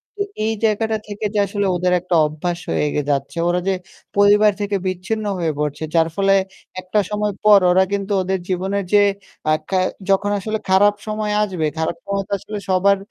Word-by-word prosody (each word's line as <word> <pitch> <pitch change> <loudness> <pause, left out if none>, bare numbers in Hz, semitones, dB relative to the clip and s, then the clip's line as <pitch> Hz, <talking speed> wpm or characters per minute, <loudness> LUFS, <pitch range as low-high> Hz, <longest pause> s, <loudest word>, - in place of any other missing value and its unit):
তো 410 - -5 0.2
এই 225 - +1
জায়গাটা 220 0 +1
থেকে 205 +1 -5 0.2
আসলে 200 +1 -2
ওদের 180 +1 +1
একটা 180 0 -1
অভ্যাস 165 +3 -3
হয়ে 150 - +1
গে 150 - +1
যাচ্ছে। 140 +4 -1
ওরা 175 +1 +1
যে 195 - +3 0.4
পরিবার 205 +1 +6
থেকে 205 0 -1
বিচ্ছিন্ন 190 +4 -3
হয়ে 165 -2 0
পড়ছে। 150 +1 -2
যার 165 -1 +4
ফলে 195 0 +3 0.5
একটা 185 +3 0
সময় 210 0 -1
পর 210 -1 +7
ওরা 190 +1 +5
কিন্তু 200 0 -2
ওদের 190 +1 -1
জীবনে 190 +2 -1 0.2
যে 205 - +7 0.5
আ - - +5 0.2
কে 190 - +1 0.3
যখন 195 +1 +2
আসলে 215 +3 -2
খারাপ 205 +2 +5
সময় 215 0 -2
আসবে 185 -6 -2
খারাপ 160 +1 -1
সময় 200 0 -1
তো - - -20
আসলে 210 +2 -7
সবার 195 +2 +4
195 Hz, 185 wpm, -20 LUFS, 180-210 Hz, 0.5 s, পর